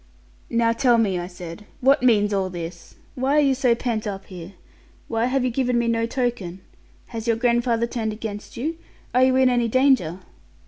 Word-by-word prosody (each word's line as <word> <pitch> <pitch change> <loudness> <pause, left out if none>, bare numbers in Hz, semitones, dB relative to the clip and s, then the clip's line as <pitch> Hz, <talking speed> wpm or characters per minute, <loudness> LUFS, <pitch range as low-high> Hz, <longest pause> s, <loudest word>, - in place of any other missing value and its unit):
'Now 230 -1 +2
tell 240 0 +3
me,' 200 -5 +1
I 175 - -5
said; 175 +1 -9
'what 275 +3 +4
means 210 -4 +3
all 190 -1 0
this? 170 -1 -8 0.2
Why 265 +3 +1
are - - +6
you 275 -2 +3
so 250 -2 +2
pent 230 -3 -2
up 195 -1 -5
here? 180 0 -10 0.5
Why 230 0 0
have 260 +1 +1
you 250 - 0
given 250 0 0
me 235 0 +1
no 230 0 +1
token? 230 -8 -3 0.5
Has 225 -1 -6
your 230 - +3
grandfather 235 -1 +1
turned 230 -2 -3
against 210 -1 -7
you? 320 +7 -3 0.3
Are 250 +1 +4
you 260 0 +4
in 260 0 +5
any 240 -2 +2
danger?' 255 - +2
230 Hz, 190 wpm, -23 LUFS, 205-255 Hz, 0.5 s, are